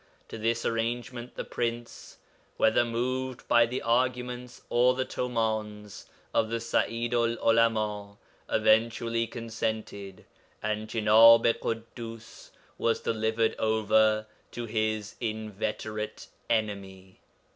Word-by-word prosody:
To 115 - -7
this 115 +1 0
arrangement 120 +1 -3
the - - -4
Prince, 120 0 -4 0.4
whether 110 +2 +4
moved 125 +2 -3
by 120 0 +5
the 125 +2 -4
arguments 125 +1 -1
or 125 +1 +3
the 130 0 -1
tumāns 110 -5 -3 0.3
of 110 - +2
the 115 0 -1
Sa'idu'l 115 0 0
'Ulama, 110 -3 +1 0.3
eventually 115 +1 +2
consented, 110 -4 -5 0.4
and 105 0 -2
Jenāb 115 +1 +6
i 115 - +5
Ḳuddus 115 0 -7 0.3
was 115 - +1
delivered 110 0 0
over 110 0 +3 0.2
to 120 - -6
his 110 -2 -2
inveterate 110 -1 -4 0.2
enemy. 100 -4 -3
115 Hz, 105 wpm, -28 LUFS, 110-120 Hz, 0.4 s, Jenāb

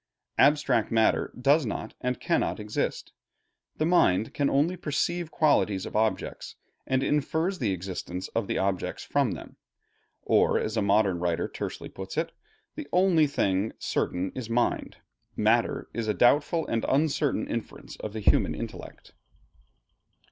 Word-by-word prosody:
Abstract 140 -5 +4
matter 110 -1 +2
does 145 +5 +4
not 110 - -4
and 125 -1 -2
cannot - - 0
exist. 105 0 -3 0.6
The 155 - +1
mind 115 - +3
can 140 -1 +1
only 150 +6 +2
perceive 170 +1 -2
qualities 105 - +2
of - - -8
objects, 110 -3 -1 0.3
and 130 0 +1
infers 160 +6 0
the 110 -7 0
existence 90 0 -5
of 115 -3 -2
the - - -1
objects 95 -1 -1
from 140 -8 +1
them; 80 - -10 0.7
or - - +3
as 110 - -2
a 110 - +1
modern 100 -3 +2
writer 85 -1 0
tersely - - -6
puts 95 +7 -8
it, 160 - 0 0.4
"The 305 -2 -7
only 180 -4 +4
thing 100 -6 0
certain 90 +2 -2
is 125 -3 -6
mind. 120 +1 0 0.4
Matter - - +1
is 115 -2 -3
a 105 - 0
doubtful 145 +6 +3
and 115 -1 -1
uncertain 145 +2 +1
inference - - -6
of 105 - -6
the 110 - -4
human - - +3
intellect." - - -8
120 Hz, 145 wpm, -27 LUFS, 100-150 Hz, 0.7 s, Abstract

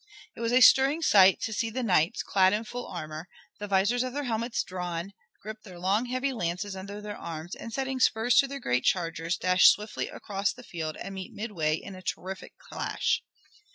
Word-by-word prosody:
It - - -12
was 230 0 -1
a 250 +1 +4
stirring 275 +6 +6
sight 195 - +6
to 220 - -2
see 225 +1 -1
the 250 +3 -3
knights, 180 -7 +2
clad 190 -1 +3
in 215 +2 0
full 245 +2 -6
armor, 155 -1 -7 0.3
the 205 - -5
visors 200 +5 +2
of 255 -1 -3
their 290 +1 -2
helmets 235 -1 -1
drawn, 180 +1 -5 0.3
grip 215 +1 -7
their 185 -5 -12
long 195 +7 +1
heavy 255 +2 -1
lances 190 -1 -3
under 200 +2 -7
their 210 0 -6
arms, 165 +1 -7
and 230 - -8
setting 265 +2 -2
spurs 240 0 +3
to 275 - +4
their 280 +1 -6
great 125 - 0
chargers, 170 -1 0
dash 180 0 +5
swiftly 210 +1 +2
across 195 -1 -3
the 250 - -13
field 160 -7 -5
and 195 - -7
meet 190 -1 -8
midway 170 -9 -1
in 195 - -8
a 185 - -10
terrific 190 +1 -6
clash. - - -2
200 Hz, 200 wpm, -28 LUFS, 180-235 Hz, 0.3 s, stirring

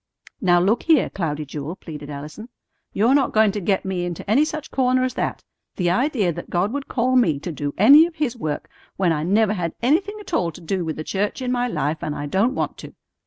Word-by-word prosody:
"Now, 175 -1 +4
look 200 +7 +2
here, 320 -5 +3
Cloudy 155 -5 -3
Jewel," 150 +4 -6
pleaded 150 -5 -9
Allison. 150 - -8 0.4
"You're 225 +6 +3
not 280 -2 +2
going 215 -1 +4
to 205 - -3
get 195 +1 0
me 185 -2 -2
into 175 +1 -5
any 235 +9 +4
such 310 0 -6
corner 255 -1 +2
as 255 - -1
that. - - -3 0.3
The 175 -2 +1
idea 215 - +1
that - - -8
God 185 +6 0
would 285 -1 -4
call 255 +1 0
me 170 - +3
to 160 +5 -6
do 145 -2 -4
any 285 - +8
of 340 - -13
His 295 -6 -1
work 155 -10 -4 0.3
when 185 -3 +2
I 150 -2 0
never 205 +5 +2
had 170 -5 -3
anything 345 - +1
at 410 - -11
all 170 - +1
to 180 - -12
do 180 +2 -2
with 160 -1 -3
the 155 - -5
church 205 +8 -2
in 255 -1 -2
my 245 0 0
life, 155 - -2
and 150 - -3
I 145 - -4
don't 200 - +1
want - - -3
to. - - -11
195 Hz, 235 wpm, -22 LUFS, 165-255 Hz, 0.4 s, any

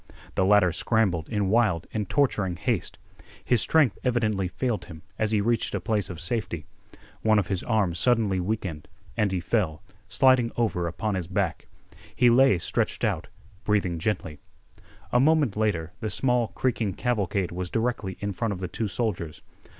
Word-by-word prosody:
The - - +1
latter 100 -2 +5
scrambled 95 -6 0
in 105 -4 0
wild 110 -8 +2
and 105 -3 -2
torturing 105 -10 +1
haste. 85 - -2 0.5
His 120 -4 +3
strength 150 -9 +3
evidently 110 -6 +1
failed 115 +4 -2
him 80 -3 -11 0.2
as 110 - +1
he 105 -1 +2
reached 115 +2 0
a - - 0
place 105 -3 -1
of 90 -3 -7
safety. 85 -4 -2 0.6
One 110 -1 +4
of 100 -4 0
his 95 -3 -1
arms 100 -7 0
suddenly 110 -4 +2
weakened, 90 -5 -3 0.3
and 105 -2 +1
he 95 - 0
fell, 85 -4 -1 0.3
sliding 130 -3 +4
over 100 -7 0
upon 105 +6 -2
his 90 -3 -3
back. 95 -2 -2 0.5
He 120 -1 +5
lay 130 -4 +5
stretched - - -2
out, - - 0 0.4
breathing 95 -5 0
gently. 80 -6 -2 0.7
A 125 - +4
moment 150 -5 +3
later 90 -7 -1
the 110 - -3
small, 120 +3 +1
creaking 115 -6 -1
cavalcade 100 -6 -1
was 90 0 -4
directly 115 -4 -2
in 100 -1 -2
front 115 +1 -1
of 90 - -7
the 90 - -3
two 105 +5 -3
soldiers. 90 -7 -3
105 Hz, 165 wpm, -26 LUFS, 90-115 Hz, 0.7 s, latter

